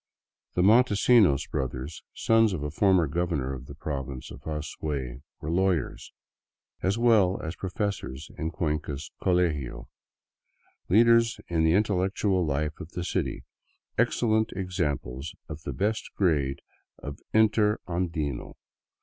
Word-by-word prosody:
The 90 - +3
Montesinos 105 - +5
brothers, 65 +3 -3
sons 115 -2 +3
of 80 -5 -3
a 75 - -3
former 95 +1 +4
governor 75 -4 -1
of 65 0 -8
the 70 - -9
Province 70 -4 -5
of 65 - -10
Azuay, 75 -4 -4 0.2
were 80 - -4
lawyers, 90 -4 0 0.7
as 95 +3 +1
well 110 -6 +4
as 80 +2 -4
professors 90 -7 -4
in 80 - -2
Cuenca's 75 -4 -3
colegio, 85 -8 0 1.0
leaders 115 +2 +5
in 80 -2 +1
the 80 0 +4
intellectual 95 -1 +1
life 75 0 -1
of 80 - -8
the 90 - -3
city, - - -2 0.5
excellent 110 -2 +2
examples 80 -8 -3
of 75 0 -7
the - - -5
best 110 +3 -1
grade 70 -8 +1 0.3
of 70 - -7
" - - -48
interandino." 90 - +1
85 Hz, 125 wpm, -27 LUFS, 75-100 Hz, 1.0 s, Montesinos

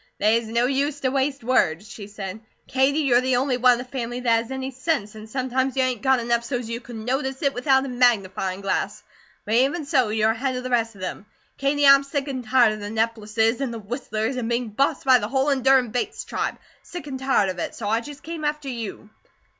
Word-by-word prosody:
"They's 220 +2 +2
no 235 +2 +1
use 280 +2 0
to 260 - +1
waste 270 -1 -1
words," 210 -7 +1
she 205 -1 -9
said. 200 -1 -7 0.3
"Katie, 270 +3 +2
you're 250 -4 +4
the 255 0 +1
only 255 0 +1
one 250 0 +6
in - - -1
the 245 - -5
family 250 -2 -5
that 230 -2 +3
has 230 - -10
any 265 0 -4
sense, 260 -5 -2
and 215 0 -11
sometimes 260 +1 -1
you 260 - +4
ain't 250 -4 -1
got 265 0 +3
enough 235 0 0
so's 245 -1 -3
you 230 +1 -4
could 240 -1 -10
notice 265 +5 -2
it 275 -1 +2
without 265 +2 +2
a - - -4
magnifyin' 200 -7 +1
glass; 195 - -2 0.4
but 215 - -2
even 275 +7 +2
so, 265 -7 +2
you're 220 0 +2
ahead 255 +3 -2
of 250 - -4
the 255 - -5
rest 230 -2 +1
of 190 - -13
them. 185 +2 -5 0.3
Katie, 285 +1 +2
I'm 275 0 +8
sick 275 0 -3
an' 265 -2 -3
tired 240 -2 +4
of 215 - -7
the 205 0 -6
Neppleses 225 +1 0
and 265 -3 -1
the 230 - -5
Whistlers 220 +2 -3
and 235 -2 -2
being 235 -1 -1
bossed 270 +7 0
by 260 -2 +6
the 210 - -3
whole 265 +4 +1
endurin' 265 -3 +3
Bates 245 +1 -3
tribe; - - -3 0.2
sick 350 -3 -8
and 270 -3 -5
tired 265 -7 +2
of 185 - -5
it, - - -4
so 215 - -5
I 225 +2 +1
just 290 +3 -10
came 325 -1 -6
after 295 -1 -2
you." 225 -3 -6
250 Hz, 235 wpm, -23 LUFS, 225-270 Hz, 0.4 s, I'm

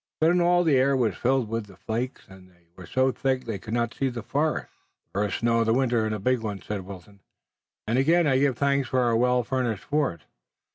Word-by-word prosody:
Then 170 +3 +3
all 175 0 +4
the 155 -5 +3
air 135 +1 +3
was 120 -4 +1
filled 130 -1 +1
with 115 -1 -3
the 95 - -15
flakes, 120 +5 -4
and 95 -1 -15
they 85 -2 -29
were 90 -2 -11
so 130 +4 +2
thick 130 0 -1
they 110 -4 -4
could 110 +2 -5
not 120 0 -1
see 135 - -1
the 120 -3 -6
forest. 145 +6 -1 0.4
"The 100 - -2
first 105 -1 -1
snow 115 0 +2
of 115 - +1
the 115 - +3
winter 120 -4 +1
and 110 - -2
a - - -3
big 125 +5 +1
one," 105 -3 -4
said 100 -2 -5
Wilton, 100 +1 -12 0.7
"and 115 +4 +1
again 165 +5 +3
I 135 -3 +3
give 135 -3 +1
thanks 140 -2 +1
for 130 - +1
our 120 -2 +2
well 125 +1 +2
furnished 120 -4 -2
fort. 140 - -1
120 Hz, 235 wpm, -26 LUFS, 110-135 Hz, 0.7 s, all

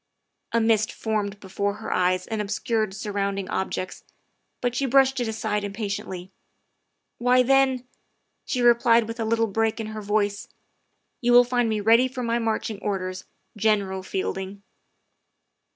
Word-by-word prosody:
A 230 - +2
mist 225 -1 +2
formed 210 -2 -2
before 200 +1 -2
her - - -4
eyes 185 0 +1
and 220 -1 -3
obscured 210 0 -1
surround 200 -1 -2
ing 195 -1 -4
objects, 185 -1 -3 0.6
but 245 -1 -1
she 275 +2 0
brushed 270 +1 +4
it 240 - -1
aside 215 -1 -2
impatiently. 195 -3 -5 0.4
" - - -52
Why, 250 +1 +4
then," 265 -1 +3 0.6
she 250 -2 -1
replied 235 -1 +5
with 230 +1 -6
a 225 - -1
little 225 +1 +2
break 225 +1 0
in 225 - -3
her 215 - -5
voice, 205 0 -1 0.4
" - - -49
you 245 0 +2
will 245 0 +9
find 245 -1 0
me 215 -1 -1
ready 230 +4 +5
for 255 -1 -5
my 235 0 0
marching 220 -2 -2
orders, 185 -3 -3 0.3
General 205 -3 +1
Fielding." 190 +1 -4
220 Hz, 155 wpm, -25 LUFS, 200-235 Hz, 0.6 s, will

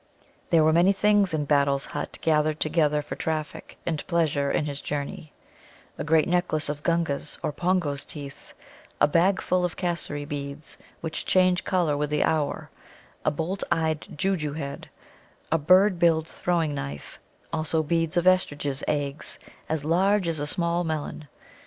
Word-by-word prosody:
There 165 -2 +5
were 155 0 +4
many 175 +4 +5
things 205 -1 +3
in 155 -2 0
Battle's 140 -1 +2
hut - - -5
gathered 155 -1 +2
together 150 -2 +2
for - - -6
traffic 155 -1 -4
and 160 -3 -2
pleasure 155 -5 +1
in 150 - 0
his 145 -1 -4
journey: 150 +3 -5 0.6
a - - -4
great 160 +1 +3
necklace 175 -4 +1
of 145 0 -4
Gunga's 165 -3 -1
or - - 0
Pongo's 170 -4 0
teeth; 140 -2 -10 0.4
a - - +6
bagful 180 +2 +2
of 175 -2 -2
Cassary 170 -5 -2
beads, 145 0 -6 0.2
which 160 -1 -4
change 185 -1 +3
colour 175 -6 +1
with 145 0 -1
the 150 0 +1
hour, 155 -3 -1 0.5
a - - +3
bolt 165 +6 -3
eyed 160 -2 +1 0.2
Joojoo 155 -4 0
head, 140 -3 -6 0.6
a 165 - +3
bird 185 +4 +5
billed 165 -2 +3
throwing 165 -4 -1
knife, 70 - -6 0.3
also 160 0 0
beads 165 +2 0
of 175 - +2
Estridges' 145 -6 +1
eggs, 145 -1 -2 0.3
as 155 -2 -1
large 190 +4 +2
as 165 -2 -1
a 145 - -1
small 170 +2 0
melon. 155 -2 -4
160 Hz, 155 wpm, -26 LUFS, 145-175 Hz, 0.6 s, a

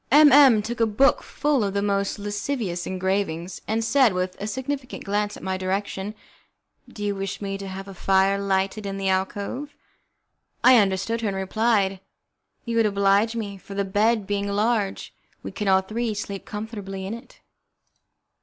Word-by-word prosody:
M 295 +1 +7
M 265 -7 +7
took 235 +2 -4
up - - +6
a - - -5
book 270 +7 +4
full 290 -5 0
of 200 -1 -2
the 200 - +1
most 200 0 0
lascivious 205 -2 -3
engravings, 190 -2 -2
and 225 +1 0
said, 230 -1 +4
with 185 0 -2
a 205 - -3
significant 260 +3 -4
glance 205 +1 -1
in - - -13
my 190 0 -2
direction: 195 +2 -3 0.7
"Do 205 - -8
you 205 0 0
wish 195 0 -4
me 195 -1 -4
to 195 - -6
have 195 +1 -7
a 195 - -8
fire 195 +1 +2
lighted 195 +1 -1
in 195 0 -4
the 195 -1 -1
alcove?" 205 +9 -2 0.9
I 255 0 +8
understood 200 +3 0
her, 225 - -1
and 195 -1 -2
replied: 195 0 +1 0.7
"You 230 -1 -2
would 225 -1 +4
oblige 200 +2 +2
me, 200 -4 -5
for 195 - -10
the 200 0 0
bed 210 +2 +2
being 200 0 -1
large 205 0 -1 0.3
we - - -6
can 210 - -4
all 190 0 +5
three 220 +3 -3
sleep 200 -1 -5
comfortably 205 -3 -6
in 195 - -4
it." 235 - -11
205 Hz, 180 wpm, -24 LUFS, 195-225 Hz, 0.9 s, I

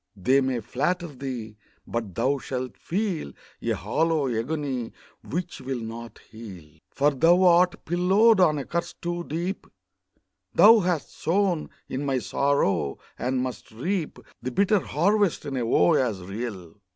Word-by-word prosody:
they 130 +8 +3
may 130 -2 0
flatter 150 - -1
thee, 125 -6 -6 0.3
but 115 -6 -4
thou 135 +4 +1
shall 130 -1 -4
feel 180 - -3 0.3
A - - -2
hollow 150 - 0
agony 130 0 -3 0.3
which 175 0 -4
will 130 -1 -3
not 115 0 -8
heal, 90 -9 -11
For 145 +6 +2
thou 170 +7 +4
art 180 0 +4
pillowed 190 +6 +4
on 155 -5 +4
a 140 - -4
curse 170 0 -3
too 175 0 -4
deep; 175 +5 -4 0.9
Thou 225 +2 +8
hast 175 -5 -1
sown 180 -1 0 0.2
in 130 +2 -3
my 135 -2 0
sorrow, 130 - 0 0.2
and 125 0 0
must 130 -1 -6
reap 160 - -3 0.2
The 125 - -3
bitter 200 - +3
harvest 195 +4 +1
in 140 - -4
a 120 -3 -1
woe 90 -6 +4
as 115 -7 +1
real! 100 -3 -6
140 Hz, 145 wpm, -25 LUFS, 115-175 Hz, 0.9 s, Thou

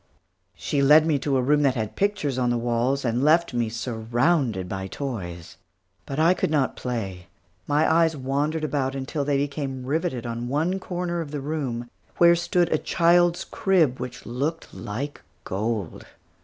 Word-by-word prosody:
She 145 - -1
led 150 +3 +7
me 155 -3 +2
to 135 -1 0
a 130 - +1
room 145 +3 +3
that 135 -2 +2
had 110 -3 -3
pictures 195 -10 0
on 125 -1 +1
the 120 - +1
walls, 120 +3 0
and 120 +2 0
left 160 0 +3
me 120 -2 0
surrounded 115 - 0
by 95 +1 -4
toys. 90 - -6 0.5
But 135 - -4
I 165 +3 +5
could - - -1
not 150 -4 +1
play. 100 -8 -4 0.4
My 150 +2 +3
eyes 160 -1 +3
wandered 145 +4 -1
about 135 -2 -1
until 140 +2 -3
they 140 0 +1
became 140 -2 -3
riveted 145 -3 -1
on 120 0 -4
one 160 +8 0
corner 175 -2 -3
of 155 - -6
the 145 0 -4
room, 135 -5 -3 0.3
where 170 0 +6
stood 170 0 +1
a 155 - +2
child's 175 +1 +3
crib 165 -10 +1
which 125 0 -7
looked 145 +7 -3
like 135 +8 -5 0.2
gold. 105 -2 -3
140 Hz, 170 wpm, -25 LUFS, 120-160 Hz, 0.5 s, led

